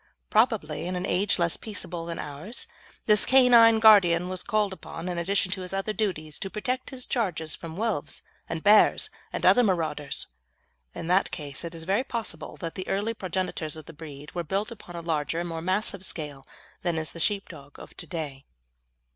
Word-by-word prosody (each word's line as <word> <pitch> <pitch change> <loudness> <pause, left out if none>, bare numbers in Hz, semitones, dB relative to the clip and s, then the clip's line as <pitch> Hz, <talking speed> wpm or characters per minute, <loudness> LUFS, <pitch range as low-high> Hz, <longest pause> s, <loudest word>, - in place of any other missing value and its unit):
Probably, 210 -9 +2
in 180 - -2
an 180 +1 -2
age 200 +2 +2
less 170 -2 +1
peaceable 180 -5 -4
than 170 - -4
ours, 150 +11 -4 0.4
this 210 -1 +5
canine 240 -4 +7
guardian 185 -6 +6
was 185 -1 -2
called 215 -4 0
upon, 175 -2 -8
in 175 -1 -2
addition 185 +2 +1
to 190 - -3
his 180 +1 -5
other 195 +2 -1
duties, 165 -9 -2
to 195 - -3
protect 255 +6 -2
his 255 -2 -4
charges 170 -9 -1
from 165 0 -7
wolves 200 -10 -1 0.3
and 165 -1 -3
bears 210 +1 +5 0.2
and - - -3
other 245 - +7
marauders. 160 - 0 0.7
In - - -5
that 180 +3 +3
case 145 -3 -6
it 170 0 -5
is 165 - -7
very 195 +8 +1
possible 230 - -5
that 165 -2 -5
the 185 - -6
early 205 +4 0
progenitors 185 -5 -3
of 155 - -9
the 165 - -11
breed 150 -2 -10
were 175 - -2
built 200 +7 -1
upon 180 -6 -10
a 170 - -4
larger 165 -1 -1
and 175 - -2
more 165 -1 -4
massive 190 +2 -1
scale 145 -7 -6 0.3
than 175 -2 -1
is 155 -2 -3
the 170 - -9
sheepdog 165 -7 -1
of - - -12
to 170 - -6
day. 145 -4 -5
180 Hz, 190 wpm, -27 LUFS, 160-210 Hz, 0.7 s, canine